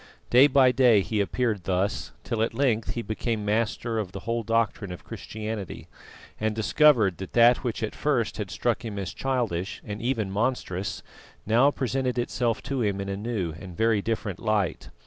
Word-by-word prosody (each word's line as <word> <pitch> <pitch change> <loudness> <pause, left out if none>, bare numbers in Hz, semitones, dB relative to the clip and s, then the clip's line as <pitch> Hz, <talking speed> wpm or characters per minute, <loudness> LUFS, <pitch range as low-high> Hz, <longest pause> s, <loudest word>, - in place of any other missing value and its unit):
Day 130 +4 +8
by 130 -2 +5
day 120 -4 +5
he 105 +2 -1
appeared 105 -3 -1
thus, 95 +4 -1
till 115 -3 -2
at 115 - 0
length 120 -5 +1
he 120 - -3
became 110 -1 -2
master 115 +1 0
of 95 -4 -4
the 95 - -6
whole 115 +2 -1
doctrine 115 -3 0
of 90 - -8
Christianity, 110 -2 -6 0.5
and 110 0 0
discovered 110 - +4
that 95 - -7
that 120 +1 +6
which 120 -3 -3
at 110 - -2
first 125 -8 0
had 105 -3 -4
struck 120 +5 -1
him 110 -3 -5
as 95 -2 -4
childish 115 -9 -2
and 105 0 -5
even 115 -5 -1
monstrous, 100 -3 -2 0.4
now 120 +6 +5
presented 130 -2 -1
itself 120 -1 -1
to 135 -2 -2
him 100 -3 0
in 100 0 -4
a 100 - -2
new 100 -6 -3
and 90 -3 -10
very 110 -2 +3
different 105 -4 -3
light. 110 -5 -1
110 Hz, 180 wpm, -26 LUFS, 100-120 Hz, 0.5 s, Day